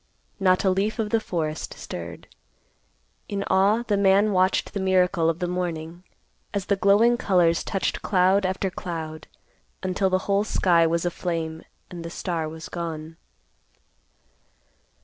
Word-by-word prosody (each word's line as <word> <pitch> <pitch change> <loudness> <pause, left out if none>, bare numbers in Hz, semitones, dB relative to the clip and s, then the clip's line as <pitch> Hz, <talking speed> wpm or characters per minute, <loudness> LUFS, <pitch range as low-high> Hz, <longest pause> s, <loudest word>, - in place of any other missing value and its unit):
Not 185 -2 +3
a 190 - +4
leaf 200 +5 0
of 215 -2 -2
the 225 - +3
forest 160 -7 -3
stirred. 85 -1 -8 1.0
In 200 -1 -2
awe 200 +5 +3
the 210 -4 0
man 200 +2 +4
watched 185 0 +1
the 200 - -2
miracle 180 -3 +2
of 165 - -1
the 180 0 -2
morning, 175 -1 -4 0.5
as 200 -2 -1
the 200 - +2
glowing 205 +5 +4
colors 180 -7 +2
touched 195 - -2
cloud 190 0 +3
after 190 0 -1
cloud, 160 -3 -6 0.6
until 185 +1 +1
the 185 - +2
whole 200 0 +2
sky 170 -5 +3
was 170 +1 0
aflame, 165 -2 -3 0.3
and 175 -2 -7
the 165 - -6
star 165 -2 -3
was 160 +1 -8
gone. 160 -2 -6
185 Hz, 145 wpm, -24 LUFS, 165-195 Hz, 1.0 s, a